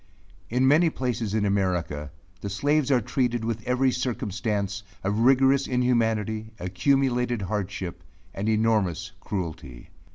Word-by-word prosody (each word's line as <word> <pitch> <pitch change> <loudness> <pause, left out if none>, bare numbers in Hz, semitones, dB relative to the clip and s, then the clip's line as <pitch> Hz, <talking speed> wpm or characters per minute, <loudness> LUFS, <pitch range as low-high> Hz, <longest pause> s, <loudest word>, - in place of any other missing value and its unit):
In 125 +3 +2
many 160 +5 +5
places 120 -7 -2
in 105 -2 +1
America, 90 -7 -1 0.3
the 100 - -5
slaves 145 +7 +1
are 130 -3 +4
treated 120 0 -1
with 115 -1 -2
every 130 +1 +2
circumstance 105 -5 -2 0.2
of 100 +3 0
rigorous 135 +2 +4
inhumanity, 110 -4 0
accumulated 120 +4 +1
hardship, 95 -3 -4 0.3
and 100 +3 -2
enormous 110 -5 +1
cruelty. 80 -10 -6
110 Hz, 120 wpm, -26 LUFS, 100-125 Hz, 0.3 s, many